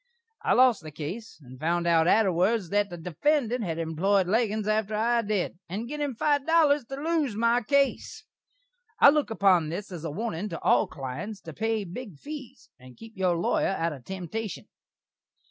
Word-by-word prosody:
I -, -, +2 dB
lost 250 Hz, -3 st, +5 dB
the 155 Hz, -, -8 dB
case, 170 Hz, +10 st, -7 dB
and 130 Hz, 0 st, -13 dB
found 170 Hz, +3 st, 0 dB
out 165 Hz, -1 st, +3 dB
atterwards 190 Hz, 0 st, +2 dB
that 205 Hz, 0 st, +1 dB
the 175 Hz, -, -7 dB
defendant 240 Hz, -, 0 dB
had 165 Hz, -4 st, -3 dB
employed 175 Hz, +4 st, +1 dB
Leggins 215 Hz, +1 st, 0 dB
atter 215 Hz, 0 st, 0 dB
I 235 Hz, +2 st, +2 dB
did, 205 Hz, -5 st, -2 dB
and 210 Hz, +6 st, -4 dB
gin 300 Hz, +3 st, -5 dB
him 285 Hz, -4 st, -2 dB
five 285 Hz, +3 st, +1 dB
dollars 300 Hz, -5 st, +4 dB
to 270 Hz, -, -6 dB
lose 300 Hz, -5 st, -1 dB
my 235 Hz, +2 st, +2 dB
case. 275 Hz, +4 st, 0 dB, 0.7 s
I 285 Hz, -, +9 dB
look 300 Hz, -3 st, 0 dB
upon 190 Hz, -7 st, +3 dB
this 190 Hz, +5 st, -5 dB
as 170 Hz, -3 st, -7 dB
a 165 Hz, -, -3 dB
warnin' 205 Hz, +3 st, -3 dB
to 165 Hz, -, -6 dB
all -, -, +3 dB
klients 155 Hz, +10 st, -6 dB
to 160 Hz, -, -8 dB
pay 220 Hz, +3 st, -1 dB
big 195 Hz, -, -8 dB
fees 275 Hz, -, -10 dB
and 130 Hz, -1 st, -15 dB
keep 225 Hz, 0 st, -12 dB
your 185 Hz, -2 st, +1 dB
lawyer 175 Hz, +3 st, +1 dB
out 165 Hz, -1 st, -1 dB
of 135 Hz, -4 st, -11 dB
temtashun. 190 Hz, +2 st, -5 dB
205 Hz, 180 wpm, -27 LUFS, 170-235 Hz, 0.7 s, I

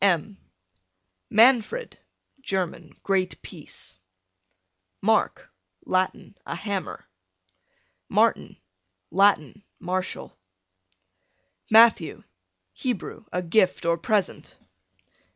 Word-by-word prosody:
M 195 Hz, +1 st, +2 dB, 0.9 s
Manfred, 250 Hz, -, +3 dB, 0.4 s
German, 180 Hz, -, -3 dB
great 190 Hz, -2 st, 0 dB
peace. 95 Hz, -, -8 dB, 1.0 s
Mark, -, -, +1 dB, 0.3 s
Latin, 185 Hz, +2 st, -1 dB
a -, -, -5 dB
hammer. 200 Hz, +1 st, -5 dB, 1.0 s
Martin, -, -, +1 dB, 0.5 s
Latin, 195 Hz, 0 st, +2 dB, 0.2 s
martial. 185 Hz, +1 st, -4 dB, 1.3 s
Matthew, 220 Hz, -6 st, +5 dB, 0.5 s
Hebrew, 240 Hz, -3 st, -4 dB
a 180 Hz, -, -2 dB
gift 185 Hz, +1 st, +2 dB
or 170 Hz, 0 st, +3 dB
present. 200 Hz, +4 st, -2 dB
190 Hz, 70 wpm, -25 LUFS, 180-215 Hz, 1.3 s, Matthew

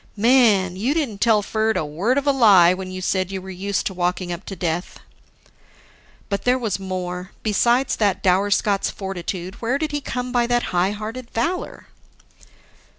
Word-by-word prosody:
Man, 215 Hz, -5 st, +4 dB
you 250 Hz, +10 st, 0 dB
didn't 240 Hz, -11 st, -2 dB
tell 220 Hz, -3 st, +4 dB
Ferd 220 Hz, 0 st, 0 dB
a 170 Hz, -, -1 dB
word 185 Hz, -, 0 dB
of 280 Hz, -, 0 dB
a 285 Hz, -, +4 dB
lie 200 Hz, -10 st, +6 dB
when 185 Hz, 0 st, -6 dB
you 185 Hz, 0 st, -6 dB
said 185 Hz, 0 st, 0 dB
you 190 Hz, -, -3 dB
were 190 Hz, +1 st, -9 dB
used 195 Hz, +2 st, -2 dB
to 190 Hz, -, -2 dB
walking 180 Hz, 0 st, -2 dB
up 175 Hz, +3 st, -8 dB
to 195 Hz, -, -6 dB
death." 175 Hz, 0 st, -3 dB, 1.3 s
(But 200 Hz, -1 st, -3 dB
there 250 Hz, +1 st, +3 dB
was 220 Hz, -6 st, -2 dB
more: 180 Hz, -1 st, -5 dB
Besides 235 Hz, +5 st, +2 dB
that 205 Hz, -3 st, +1 dB
dour 190 Hz, +2 st, +3 dB
Scot's 200 Hz, 0 st, +1 dB
fortitude, 185 Hz, -1 st, -6 dB
where 240 Hz, +4 st, 0 dB
did 310 Hz, 0 st, -3 dB
he 290 Hz, 0 st, -2 dB
come 250 Hz, -2 st, -4 dB
by 240 Hz, -1 st, +1 dB
that 240 Hz, 0 st, +1 dB
high 180 Hz, +2 st, +2 dB
hearted 225 Hz, +4 st, -7 dB
valor?) 335 Hz, +11 st, -3 dB
200 Hz, 180 wpm, -22 LUFS, 185-240 Hz, 1.3 s, lie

